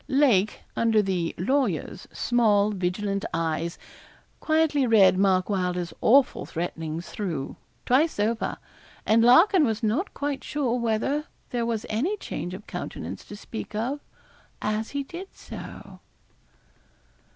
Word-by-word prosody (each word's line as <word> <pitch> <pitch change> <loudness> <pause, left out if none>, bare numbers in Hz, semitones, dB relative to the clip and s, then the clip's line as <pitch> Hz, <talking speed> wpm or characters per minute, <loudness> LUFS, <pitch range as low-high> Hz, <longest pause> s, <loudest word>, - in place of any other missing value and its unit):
Lake, 245 -8 +3
under 225 -2 +3
the 185 -5 0
'lawyer's' 210 - -1
small, 215 -4 +2
vigilant 195 +1 -2
eyes, 165 0 -1 0.6
quietly 310 -4 +2
read 205 -5 +6
Mark 185 -1 +3
Wylder's 180 -3 -1
awful 265 +3 +4
threatenings 165 -1 -4
through, 165 -10 -4 0.3
twice 280 +2 +2
over, 220 +2 0 0.5
and 220 +1 +4
Larkin 330 - +6
was 225 -3 0
not 235 - 0
quite 285 -1 -3
sure 255 -5 -1
whether 235 +6 0 0.3
there 235 -1 -1
was 225 -2 -2
any 295 - -1
change 180 - -5
of 210 +3 -11
countenance - - -6
to 205 - -9
speak 215 +1 -7
of 250 +7 -1 0.6
as 215 +1 -2
he 280 0 -3
did 350 +7 -8
so. - - -10
220 Hz, 125 wpm, -26 LUFS, 190-270 Hz, 0.6 s, read